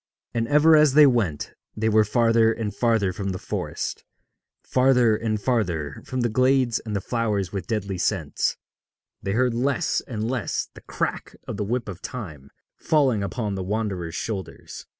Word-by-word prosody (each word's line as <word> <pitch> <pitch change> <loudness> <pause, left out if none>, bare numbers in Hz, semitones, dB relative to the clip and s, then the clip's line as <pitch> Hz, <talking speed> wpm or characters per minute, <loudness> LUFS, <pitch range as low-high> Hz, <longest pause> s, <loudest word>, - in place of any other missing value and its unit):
And 115 -1 -1
ever 150 +3 +6
as 150 -3 +5
they 150 -1 +9
went 110 - 0 0.2
they 110 +1 0
were 110 0 +5
farther 115 +1 +3
and 110 -3 -3
farther 110 -6 +1
from 100 +1 -4
the 95 - -3
forest, - - -4 0.6
farther 125 -3 +3
and 110 -1 -2
farther 90 - -1
from 130 -1 -2
the 120 - +2
glades 130 0 +2
and 110 -2 -5
the 100 - -1
flowers 105 -5 -1
with 95 -3 -4
deadly 100 -4 -2
scents; - - -1 0.6
they 95 0 -2
heard 125 +1 +2
less 140 +7 0
and 110 -3 -3
less 120 -5 -2
the - - -13
crack - - -4
of - - -4
the - - -1
whip 120 +4 -2
of 95 -3 -7
Time 80 - -7 0.3
falling 135 -9 +2
upon 105 +1 -3
the 95 - -3
wanderers' 95 -4 -3
shoulders. 100 -6 -6
110 Hz, 170 wpm, -24 LUFS, 100-125 Hz, 0.6 s, they